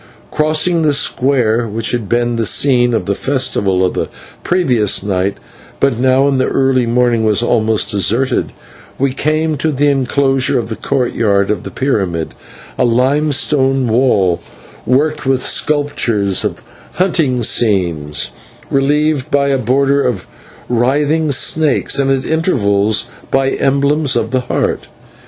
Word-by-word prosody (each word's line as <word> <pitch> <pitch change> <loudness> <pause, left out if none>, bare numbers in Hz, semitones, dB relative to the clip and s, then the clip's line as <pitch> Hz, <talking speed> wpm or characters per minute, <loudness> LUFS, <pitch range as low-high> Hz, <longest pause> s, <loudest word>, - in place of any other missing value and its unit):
Crossing 155 +3 +1
the 150 -2 +2
square, 125 -5 +1
which 110 +1 -3
had 120 -5 -3
been 120 0 0
the 115 - -1
scene 120 -2 +2
of - - -2
the 100 - 0
festival 100 -7 0
of 90 - -1
the - - -3 0.3
previous 125 - +1
night, 100 -1 -1 0.4
but 135 -4 +1
now 130 +2 +3
in 135 -2 +1
the - - +1
early 130 -2 +1
morning 120 -1 +1
was 110 +1 +2
almost 110 -2 +1
deserted, 115 +6 0 0.5
we 135 -1 0
came 155 +2 -1
to 155 +3 -1
the 145 +1 +1
inclosure 135 0 +1
of 115 -2 -3
the 110 - -4
court 125 +3 -2
yard 100 -2 +1
of 105 - -2
the - - -8
pyramid, 95 - -2 0.5
a - - +3
limestone 135 +1 +1
wall 110 -7 +1 0.5
worked 150 +3 0
with 130 -2 +1
sculptures 120 -10 0
of - - -4 0.3
hunting 155 -9 0
scenes, 85 - 0 0.4
relieved 145 +1 +1
by 140 0 +1
a 135 - +1
border 140 +3 +1
of 120 -9 -2 0.4
writhing 145 +6 +1
snakes, 145 +1 +2
and 135 -1 +1
at 135 0 0
intervals 110 - +1 0.2
by 135 0 +1
emblems 140 +1 +1
of - - -1
the 130 - +1
Heart. 125 - -2
130 Hz, 140 wpm, -14 LUFS, 110-140 Hz, 0.5 s, now